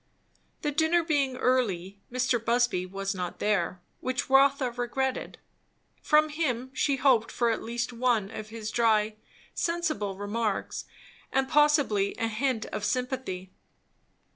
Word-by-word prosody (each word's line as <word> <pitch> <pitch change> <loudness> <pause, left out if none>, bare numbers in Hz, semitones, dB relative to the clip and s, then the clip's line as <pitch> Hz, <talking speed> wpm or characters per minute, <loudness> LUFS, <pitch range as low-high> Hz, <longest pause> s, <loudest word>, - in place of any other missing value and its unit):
The 295 - +1
dinner 320 +3 +2
being 285 -5 +1
early, 200 -8 0
Mr. 250 -2 +1
Busby 235 -6 +1
was 195 +1 -3
not 180 -2 -4
there; 190 -3 0 0.2
which 255 +2 -2
Rotha 275 -1 +4
regretted. 250 +2 -2 0.6
From 305 +1 +4
him 260 -5 -2
she 280 +1 +1
hoped 255 -4 +3
for 235 -1 +1
at 225 - -2
least 240 +2 -3
one 230 -4 +1
of 215 -1 -7
his 220 -1 -5
dry, 220 -2 +2 0.4
sensible 310 - -1
remarks, 205 0 -2 0.5
and 270 0 +1
possibly 290 -9 +3
a 225 - 0
hint 225 +1 -1
of 210 - -5
sympathy. 250 -7 -2
240 Hz, 130 wpm, -28 LUFS, 210-270 Hz, 0.6 s, Rotha